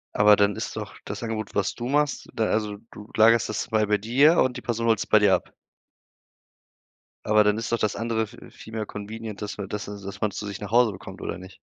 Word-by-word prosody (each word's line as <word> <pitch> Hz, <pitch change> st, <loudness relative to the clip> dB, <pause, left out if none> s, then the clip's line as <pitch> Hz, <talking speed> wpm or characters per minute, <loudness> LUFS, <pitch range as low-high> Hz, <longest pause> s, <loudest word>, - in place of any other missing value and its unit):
Aber, 105 Hz, 0 st, +7 dB
dann 100 Hz, -1 st, +2 dB
ist -, -, -5 dB
doch -, -, -6 dB
das -, -, -6 dB
Angebot, 110 Hz, -2 st, -4 dB
was 100 Hz, -, +1 dB
du 120 Hz, -, -5 dB
machst 145 Hz, +1 st, 0 dB
da 110 Hz, -, 0 dB
also 105 Hz, -1 st, -1 dB
du 105 Hz, +1 st, -11 dB
lagerst 115 Hz, -1 st, +5 dB
das 110 Hz, +2 st, -3 dB
mal 110 Hz, -1 st, +2 dB
bei 105 Hz, -, +3 dB
dir 135 Hz, +10 st, +4 dB
und 130 Hz, -1 st, +2 dB
die -, -, -7 dB
Person 115 Hz, -1 st, -2 dB
holt's 110 Hz, -3 st, +2 dB
bei -, -, +5 dB
dir 100 Hz, -2 st, +4 dB
ab? -, -, -1 dB, 1.7 s
Aber, 105 Hz, 0 st, +4 dB
dann 105 Hz, 0 st, +3 dB
ist 115 Hz, -, -4 dB
doch 115 Hz, -, +1 dB
das 105 Hz, -1 st, 0 dB
andere 115 Hz, -1 st, -1 dB
v 120 Hz, +3 st, -14 dB
viel 110 Hz, -, -13 dB
mehr 110 Hz, -1 st, -2 dB
convenient, 105 Hz, +1 st, -7 dB
dass 105 Hz, -1 st, -5 dB
man 100 Hz, -2 st, -6 dB
dass 105 Hz, -2 st, -4 dB
dass 100 Hz, -1 st, -8 dB
man 105 Hz, -1 st, 0 dB
zu 105 Hz, -, -6 dB
sich 100 Hz, -1 st, -6 dB
nach 105 Hz, -1 st, -7 dB
Hause 120 Hz, -1 st, +5 dB
bekommt 95 Hz, 0 st, -10 dB
oder -, -, -4 dB
nicht? 95 Hz, +1 st, -12 dB
110 Hz, 235 wpm, -25 LUFS, 105-115 Hz, 1.7 s, Aber